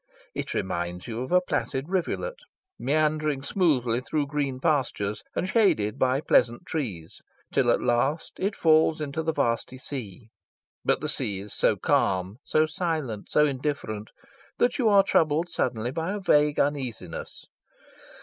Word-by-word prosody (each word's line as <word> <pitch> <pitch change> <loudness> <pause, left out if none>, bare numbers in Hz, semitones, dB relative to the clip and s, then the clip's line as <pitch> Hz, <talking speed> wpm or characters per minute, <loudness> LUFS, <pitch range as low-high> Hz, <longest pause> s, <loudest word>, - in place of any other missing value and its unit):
It - - -4
reminds 90 -1 -3
you 115 0 -4
of 130 - -5
a 180 0 +5
placid 135 -5 -2
rivulet, 195 - -2 0.4
meandering 155 -1 +1
smoothly 130 - +1
through 145 +2 -1
green 140 -2 -2
pastures 130 -9 0
and 185 - -1
shaded 190 - +2
by 130 +2 +2
pleasant 120 -5 +2
trees, 100 - -5 0.3
till - - +3
at - - +2
last 130 +6 +1
it 200 +2 -1
falls 160 0 +4
into 150 +1 -3
the 160 0 0
vasty 120 -2 -1
sea; 115 -5 -8 0.5
but - - +1
the - - -2
sea 100 -2 0
is 105 +1 -9
so - - +2
calm, 95 +2 +1
so 155 - +2
silent, 155 - -3
so 150 - +4
indifferent, 130 -7 -3 0.5
that 245 - +2
you 235 -4 +4
are 200 -1 +6
troubled 160 +1 +2
suddenly 120 -8 -1
by 165 +7 -2
a 210 - -3
vague 150 -5 +3
uneasiness. 130 - -3
140 Hz, 150 wpm, -26 LUFS, 115-160 Hz, 0.5 s, are